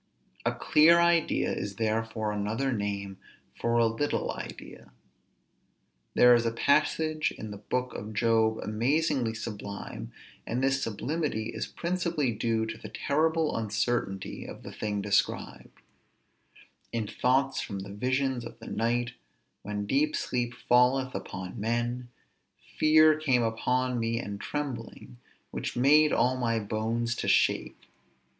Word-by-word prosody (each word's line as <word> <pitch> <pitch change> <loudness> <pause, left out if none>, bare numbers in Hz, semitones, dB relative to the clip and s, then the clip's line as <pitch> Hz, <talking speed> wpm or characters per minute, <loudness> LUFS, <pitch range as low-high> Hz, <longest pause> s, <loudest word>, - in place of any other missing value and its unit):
A - - +3
clear 165 +3 +5
idea 170 -1 +2
is 100 -1 -4
therefore 110 0 -1
another 110 +6 -1
name 100 -2 -3 0.4
for 115 - 0
a 120 -1 +5
little 115 +6 -1
idea. - - -9 1.2
There 125 0 +7
is 120 -1 +4
a 115 - 0
passage 155 +5 +1
in 110 - -7
the 100 - -8
book 125 +4 -2
of 105 +2 -6
Job 110 0 +3
amazingly 125 +2 +1
sublime, 100 - -6 0.3
and 125 +3 -2
this 135 0 +2
sublimity 115 0 -2
is - - -4
principally 170 -6 -1
due 110 0 0
to 110 - -6
the - - -8
terrible 160 +2 +1
uncertainty 110 -3 -2
of - - -10
the - - -8
thing 105 -2 -3
described: 100 0 -1 1.1
_In 115 -3 -2
thoughts 135 +5 +1
from 100 -2 -5
the 100 +1 -8
visions 130 +3 0
of 115 - -9
the - - -12
night, 120 +2 0 0.5
when 105 0 -4
deep 145 +7 +1
sleep 120 -1 -2
falleth 130 +2 +4
upon 90 0 -6
men, 120 +3 -1 0.7
fear 155 0 +6
came 130 -6 +2
upon 125 +2 0
me 115 0 0
and 100 -3 -6
trembling, 125 -4 -5 0.3
which - - -4
made 150 +4 +5
all 130 +1 +2
my 115 -2 0
bones 110 +3 -1
to - - -3
shake. - - +2
120 Hz, 135 wpm, -28 LUFS, 110-135 Hz, 1.2 s, There